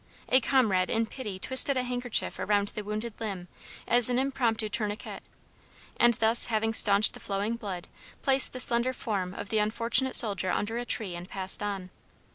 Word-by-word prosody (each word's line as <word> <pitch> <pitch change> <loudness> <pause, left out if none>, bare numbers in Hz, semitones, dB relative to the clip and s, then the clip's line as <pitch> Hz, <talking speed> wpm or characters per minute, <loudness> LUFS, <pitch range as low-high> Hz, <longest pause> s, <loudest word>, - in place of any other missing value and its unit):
A 260 +1 +3
comrade 220 -9 +1
in 225 0 -1
pity 215 -4 -8
twisted 260 +6 +3
a 255 - -1
handkerchief 245 -1 -3
around 205 -1 -1
the 210 - -8
wounded 215 +2 -6
limb 195 -5 -6 0.4
as 240 0 +5
an 245 - -1
impromptu 245 -5 -1
tourniquet, 210 -1 -5 0.7
and 240 -1 +3
thus 225 +2 +6
having 225 -1 -1
staunched 205 -1 +4
the - - -10
flowing 205 +3 -4
blood, 195 -6 -7 0.4
placed 270 -1 +4
the 255 - -7
slender 245 +1 +3
form 195 -6 -5
of - - -8
the 220 - 0
unfortunate 230 +5 0
soldier 200 -4 +2
under 225 +5 -3
a 245 - -6
tree 215 -6 -2
and 175 +1 -9
passed 190 +1 +3
on. 195 -3 -5
220 Hz, 175 wpm, -27 LUFS, 200-245 Hz, 0.7 s, thus